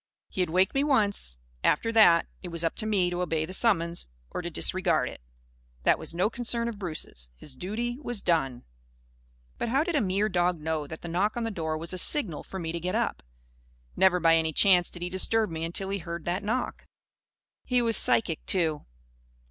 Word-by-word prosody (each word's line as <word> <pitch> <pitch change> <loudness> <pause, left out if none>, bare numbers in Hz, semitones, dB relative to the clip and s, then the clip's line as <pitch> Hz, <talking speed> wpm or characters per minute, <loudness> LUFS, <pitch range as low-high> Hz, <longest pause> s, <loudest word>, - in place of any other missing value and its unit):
He 190 - -2
had 180 - 0
waked 185 +4 +2
me, 275 0 +2
once. 205 - +1 0.3
After 230 +9 +2
that, 175 -7 +6 0.2
it 185 - -7
was 170 -1 -3
up 165 - 0
to 215 - -1
me 190 -5 +1
to 175 0 -2
obey 160 -3 0
the 185 - -8
summons 170 - +1 0.2
or - - -3
to - - -4
disregard - - +1
it. - - -12 0.6
That - - +3
was - - -5
no 185 +4 +2
concern 235 0 -1
of 225 -3 -5
Bruce's. 155 - -2
His 135 - -8
duty 230 - -4
was 240 -8 -3
done! 135 -8 0 1.0
But - - -1
how 270 +5 +2
did 345 +1 -3
a 290 - +3
mere 200 +1 +1
dog 180 -3 +1
know 155 -1 -2
that 160 +2 -9
the - - -5
knock 195 +7 0
on 240 - -1
the 225 - -2
door 160 -5 -3
was 165 +3 -3
a 185 - -1
signal 205 - +2
for 190 - -8
me 165 -3 -3
to 170 - -3
get 180 +4 -2
up? 235 +1 -1 0.7
Never 185 -1 +4
by 165 -1 +5
any 160 -1 0
chance 180 +1 +5
did 175 - -8
he 180 - -3
disturb 210 +2 +3
me 160 0 -4
until 175 +4 -3
he 200 0 -2
heard 170 -1 -6
that 175 +3 -1
knock. 240 +5 -3 0.8
He 250 -1 +1
was 230 -1 +1
psychic, 165 -8 +2
too. 160 -5 +1
180 Hz, 210 wpm, -27 LUFS, 165-215 Hz, 1.0 s, that